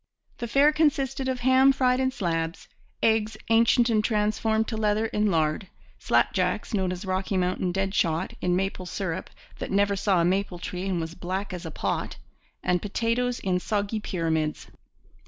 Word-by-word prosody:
The 235 - -3
fare 280 +6 +4
consisted 275 -4 +1
of 255 -1 -2
ham 260 +2 +5
fried 255 -1 +2
in 260 0 +2
slabs, 165 -8 -3 0.4
eggs 220 -1 +2
ancient 230 +1 +5
and 215 -3 +2
transformed 220 +1 +1
to 225 - -3
leather 215 0 +1
in 210 -1 0
lard, 160 +1 0 0.3
slapjacks, - - +1
known 190 -3 +1
as 185 +2 -6
'Rocky 190 +1 -1
Mountain 180 0 0
dead 195 +1 -1
shot,' 165 +1 0
in 180 0 +1
maple 185 -1 -2
syrup 185 -1 -4 0.3
that - - -4
never 200 +1 +2
saw 195 -1 +2
a 170 - +3
maple 190 0 0
tree 180 +2 -5
and 185 -3 0
was 165 0 -4
black 185 +3 -4
as 175 -2 -6
a - - -4
pot, - - -3 0.5
and 180 0 +1
potatoes 235 +4 -1
in 185 -2 0
soggy 205 +2 -1
pyramids. 160 -6 -2
200 Hz, 170 wpm, -26 LUFS, 180-225 Hz, 0.5 s, ham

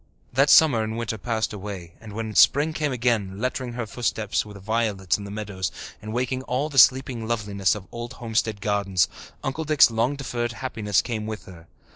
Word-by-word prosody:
That 135 +4 +4
summer 140 -8 +6
and 110 +1 -3
winter 115 -2 -3
passed 110 0 -1
away, 95 -4 -7
and 110 -2 -10
when 110 0 -4
spring 145 +9 +5
came 150 -2 -1
again, 115 -6 0
lettering 125 0 -2
her 120 -1 -3
footsteps 110 -1 -1
with 105 -1 -11
violets 105 -2 0
in 100 - -7
the - - -7
meadows 100 -3 -4 0.3
and 110 - -7
waking 125 +2 -1
all 135 +5 -1
the 135 -3 +3
sleeping 130 -3 +4
loveliness 100 -5 0
of 100 -3 -8
old 120 0 -6
homestead 110 -3 -2
gardens, 100 -4 +1 0.4
Uncle 135 +4 -2
Dick's 150 -5 +5
long 115 +5 +1
deferred 120 -3 -3
happiness 110 -6 0
came 110 -3 -4
with 110 -1 -6
her. 85 -3 -13
110 Hz, 185 wpm, -24 LUFS, 105-125 Hz, 0.4 s, summer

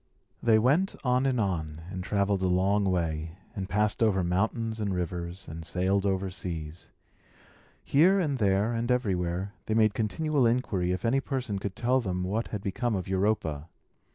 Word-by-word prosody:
They 115 -2 +5
went 145 - +2
on 125 +1 +2
and 130 -3 +1
on, 80 -6 -2
and 90 -2 -4
travelled 100 0 0
a 95 - +2
long 95 +3 +2
way, 85 -2 -1 0.2
and 95 -2 -4
passed 105 +3 +1
over 100 -5 +3
mountains 110 +5 -1
and 105 -2 -1
rivers, 90 +1 -4
and 80 +1 -7
sailed 95 +4 +1
over 95 -1 -1
seas. 85 -3 -5 0.9
Here, 180 +8 +4
and 145 -7 0
there, 100 +2 +2
and 115 +1 -2
everywhere, 95 -5 0
they 110 - 0
made 110 -2 +4
continual 130 +5 +1
inquiry 105 -7 0
if 90 +5 -2
any 125 +4 +3
person 130 -8 -3
could 100 -1 -4
tell 125 +4 +2
them 90 -4 -2
what 105 +5 -1
had 105 -2 -5
become 115 +3 -1
of 95 -3 -3
Europa. 95 -6 0
100 Hz, 170 wpm, -28 LUFS, 90-115 Hz, 0.9 s, They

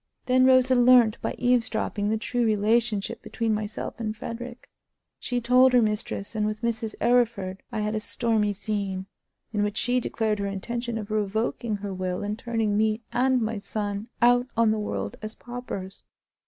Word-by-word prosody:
Then 255 0 +4
Rosa 260 0 +5
learnt, 245 -3 +5
by - - -2
eavesdropping, 230 -4 0
the 220 - +1
true 245 +2 -1
relationship 220 0 +1
between 230 -2 -1
myself 210 +1 -4
and 215 -1 -3
Frederick. 240 +2 -7 0.5
She 245 -1 -2
told 250 +2 +5
her 245 - +6
mistress, 210 -1 -2
and 215 -1 -1
with 215 +2 -4
Mrs. 225 -1 -2
Arryford 225 -6 +1
I 215 - -2
had 210 0 -1
a 215 - 0
stormy 215 -1 0
scene, 200 -2 -3 0.5
in 210 - +1
which 205 0 -1
she 245 +1 +2
declared 220 -3 -1
her 200 - -1
intention 235 +4 -3
of 215 -1 -6
revoking 215 +2 -1
her 200 -1 -5
will 185 0 -3
and 205 +1 -2
turning 225 -2 -1
me 215 +2 +1
and 255 0 +2
my 220 -1 -2
son 205 +1 -4
out 245 +1 +5
on 230 -1 +4
the 215 - 0
world 100 - -3
as 215 +1 -6
paupers. 240 -6 -7
220 Hz, 170 wpm, -26 LUFS, 210-240 Hz, 0.5 s, her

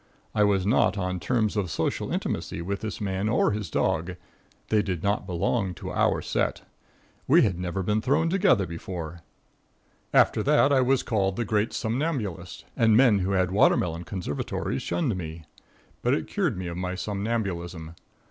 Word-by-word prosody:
I 105 - +3
was 100 -2 +2
not 105 -2 +3
on 90 -1 -2
terms 110 +1 0
of 100 -4 -1
social - - -2
intimacy - - -3
with 100 +2 -3
this 110 -2 -4
man 100 +1 -1
or 115 0 +3
his 105 -4 -3
dog. 90 +1 0 0.5
They 105 -1 +3
did 90 -5 -3
not 100 -1 0
belong 90 +2 -1
to - - -7
our - - +1
set. - - -1 0.6
We - - +6
had 90 -4 0
never 90 +1 -2
been 105 +3 +1
thrown 145 +7 +2
together 175 - +3
before. 85 -1 -6 0.9
After - - +4
that 145 -1 +4
I 135 - +4
was 130 +1 +2
called 95 -4 0
the 120 - -2
great 105 +1 0
somnambulist 110 - -3
and 110 -3 +4
men 120 -6 +5
who 95 +1 -1
had 95 -1 +1
watermelon 85 -3 +2
conservatories 80 -6 -3
shunned 140 - -1
me. 80 -2 -6 0.6
But 125 +3 +2
it - - -3
cured 175 - -1
me 95 - -4
of 85 0 -5
my 90 0 -3
somnambulism. 95 -5 -3
100 Hz, 165 wpm, -26 LUFS, 90-115 Hz, 0.9 s, We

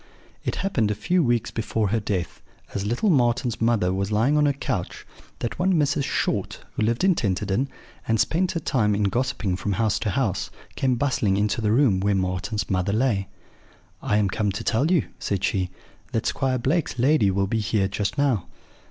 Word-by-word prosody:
"It - - -2
happened 125 - 0
a 105 - 0
few 175 - +1
weeks 120 -3 +1
before 110 -2 -1
her 115 +3 +1
death, 100 -4 -3 0.3
as 100 0 -2
little 120 - +1
Marten's 120 -4 +1
mother 115 -6 +2
was 100 +2 -2
lying 115 +8 +2
on 150 -1 +4
her 140 - +2
couch, 140 - -4 0.3
that 120 - -4
one 185 +1 +2
Mrs. 145 -3 +1
Short, - - -1 0.2
who - - -3
lived 115 +6 +1
in 190 -1 +5
Tenterden, 105 - -1 0.4
and 115 -1 +2
spent 180 - +1
her 170 - -1
time 110 -9 +1
in 105 - 0
gossiping 120 -3 0
from 100 +1 -2
house 110 +1 +1
to 105 - -1
house, 100 -4 -1 0.3
came 130 -2 +1
bustling 120 -7 +1
into 105 +2 0
the 105 -1 +1
room 115 -6 +4
where 100 +1 +1
Marten's 95 +3 -2
mother 95 0 0
lay. 110 -4 +1 0.7
"'I 105 - +1
am 105 -2 +2
come 105 0 0
to 100 - -4
tell 135 +8 +1
you,' 175 -6 +2
said 100 -1 -2
she, 95 -3 0 0.4
'that 115 -1 0
Squire 130 -2 0
Blake's 135 +4 0
lady 125 -4 +3
will 95 +1 +1
be 110 +3 -1
here 105 -1 +1
just 100 +5 -2
now.' 130 -11 +1
110 Hz, 195 wpm, -24 LUFS, 100-135 Hz, 0.7 s, in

